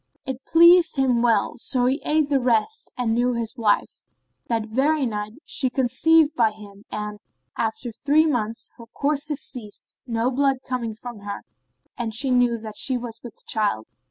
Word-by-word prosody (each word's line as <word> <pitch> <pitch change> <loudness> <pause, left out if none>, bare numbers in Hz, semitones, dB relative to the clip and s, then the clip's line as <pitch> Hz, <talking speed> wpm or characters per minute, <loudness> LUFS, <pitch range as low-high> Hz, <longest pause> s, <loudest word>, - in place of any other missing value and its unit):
It 265 -1 -5
pleased 340 +1 +6
him 260 -4 +2
well, 235 0 +1
so 245 +1 +2
he 265 +4 +1
ate 305 -1 +2
the 280 -2 +2
rest 245 - +1
and 240 -3 0
knew 245 +2 +1
his 230 0 -3
wife. 220 -4 0 0.4
That 225 -2 -1
very 270 +6 +1
night 210 -2 -4
she 265 -3 0
conceived 290 +5 +3
by 230 -7 +3
him 205 -1 -14
and, 210 0 -5 0.4
after 230 +2 -3
three 290 +7 +2
months, 230 -7 -2
her 230 -2 -12
courses 290 +3 -1
ceased, 215 -6 -4
no 235 +1 0
blood 270 0 +1
came 235 -4 -3
from 240 0 -9
her 200 0 -7 0.6
and 225 -2 -2
she 265 +2 +1
knew 245 -1 +3
that 215 -1 -8
she 260 -2 +1
was 235 -2 -7
with 240 -3 -11
child. 205 - 0
245 Hz, 170 wpm, -23 LUFS, 220-270 Hz, 0.6 s, pleased